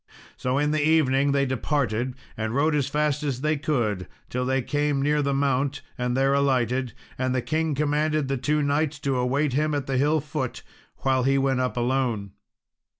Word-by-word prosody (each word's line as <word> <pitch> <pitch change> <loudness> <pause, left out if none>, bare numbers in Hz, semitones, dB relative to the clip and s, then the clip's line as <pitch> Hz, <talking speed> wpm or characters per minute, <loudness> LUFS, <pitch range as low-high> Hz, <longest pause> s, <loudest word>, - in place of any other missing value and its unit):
So 125 +1 -1
in 150 +1 +1
the 155 -1 +1
evening 145 -3 +3
they 140 0 +2
departed, 130 -2 -1 0.2
and 110 +1 -3
rode 155 +3 +2
as 145 -3 +1
fast 150 0 0
as 135 -4 -2
they 155 +1 +1
could 120 - -1 0.2
till 125 +1 -1
they 130 0 +1
came 145 +1 0
near 150 +2 +2
the 140 -1 0
mount, 140 0 0
and 125 0 -1
there 135 +1 +3
alighted; 130 -3 +1 0.3
and 130 0 0
the 125 - +1
king 160 -1 0
commanded 150 0 +1
the 135 - 0
two 150 +4 0
knights 145 +1 0
to 135 -2 0
await 135 +3 +1
him 150 +2 +1
at 140 -2 -2
the 135 -1 -1
hill 150 +3 +3
foot, 140 -3 -4 0.4
while 130 -1 +2
he 135 +2 +2
went 135 -1 +1
up 125 -1 -1
alone. 120 -5 0
135 Hz, 190 wpm, -25 LUFS, 130-150 Hz, 0.4 s, evening